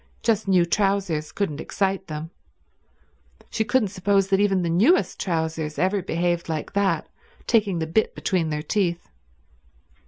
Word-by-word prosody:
Just 220 -3 +1
new 185 -3 +4
trousers 195 -4 0
couldn't 160 -7 -2
excite 195 -1 -1
them. 155 +1 -6 1.2
She 220 - 0
couldn't 220 -1 +1
suppose 195 +1 +1
that 195 -1 +3
even 195 -3 +2
the - - -1
newest 235 - +3
trousers 160 -3 -2
ever 190 +2 +1
behaved 175 -1 -1
like 155 -2 -4
that, 195 -5 +1 0.4
taking 205 -6 +2
the 160 - -1
bit 190 +8 0
between 175 -5 0
their 150 -1 -3
teeth. 175 0 -1
185 Hz, 145 wpm, -24 LUFS, 165-200 Hz, 1.2 s, new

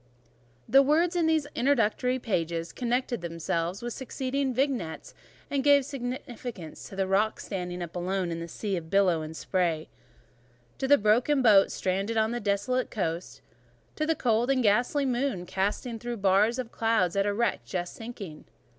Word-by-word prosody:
The 270 +4 +7
words 325 +6 +2
in 335 -2 +2
these 315 -2 +2
introductory 250 -1 +2
pages 170 -8 -2
connected 245 -2 -1
themselves 170 +3 -2
with 240 -1 -3
the - - -9
succeeding 265 +1 -2
vignettes, 250 - -2 0.3
and 280 -1 -1
gave 285 -1 +5
significance 245 - -6
to - - -10
the 195 0 0
rock 200 +3 +1
standing 180 -2 -4
up 170 0 -9
alone 180 0 -1
in 165 0 -4
a 170 - -5
sea 200 +4 -3
of 160 -1 -7
billow 185 -4 +3
and 155 +1 -7
spray; 170 -4 -1 0.9
to 265 - 0
the 285 +1 +7
broken 240 +7 +3
boat 205 -4 +6
stranded 195 +4 -1
on 220 +1 +2
a 240 - -2
desolate 205 +5 0
coast; 170 -4 -3 0.5
to 310 - -1
the 325 - +2
cold 235 -2 +1
and 265 -2 +2
ghastly 245 +7 +2
moon 250 -7 -1
glancing 210 +6 -2
through 240 +1 -4
bars 200 +4 +3
of 250 -3 -4
cloud 225 -6 +1
at 200 +1 +2
a - - +2
wreck 220 0 0
just 180 -2 -4
sinking. 210 -9 -8
220 Hz, 170 wpm, -28 LUFS, 185-255 Hz, 0.9 s, The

